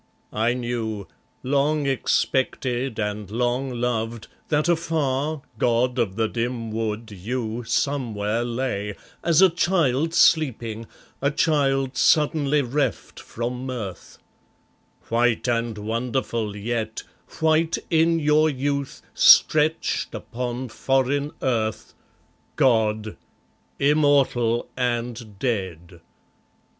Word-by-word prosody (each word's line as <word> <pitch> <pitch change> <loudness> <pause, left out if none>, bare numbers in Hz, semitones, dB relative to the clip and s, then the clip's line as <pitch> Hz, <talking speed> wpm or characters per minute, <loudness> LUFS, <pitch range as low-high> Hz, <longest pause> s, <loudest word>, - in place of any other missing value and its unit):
I 115 +3 +1
knew 115 -5 -3 0.4
Long 145 +3 +1
expected 130 -2 0
and 105 -1 -3
long 125 +4 -1
loved, 115 -2 -2 0.2
that 150 +1 +1
afar, 155 -3 0 0.2
God 125 +1 +1
of 100 -5 0
the 110 0 +1
dim 115 0 -3
wood, 110 0 -3
you 115 +4 -4
Somewhere 115 -3 -1
lay, 115 -4 -3 0.3
as 170 +2 +4
a 190 - +7
child 165 -3 +1
sleeping, 115 -8 +2 0.3
a 140 - +2
child 135 -3 +1
suddenly 150 -1 +3
reft 130 - -2
from 125 +3 -5
mirth, 110 -8 -6 0.9
White 120 +1 +1
and 115 -2 -1
wonderful 115 0 -2
yet, 110 +1 -3 0.4
white 160 +1 +2
in 165 0 +3
your 155 0 +3
youth, 140 0 -3
stretched 155 +1 +4
upon 125 +1 -5
foreign 135 +5 0
earth, 110 -4 -1 0.6
God, 110 -4 +1 0.6
immortal 140 -5 +2
and 120 -3 -3
dead! 95 -7 -3
125 Hz, 95 wpm, -23 LUFS, 115-140 Hz, 0.9 s, a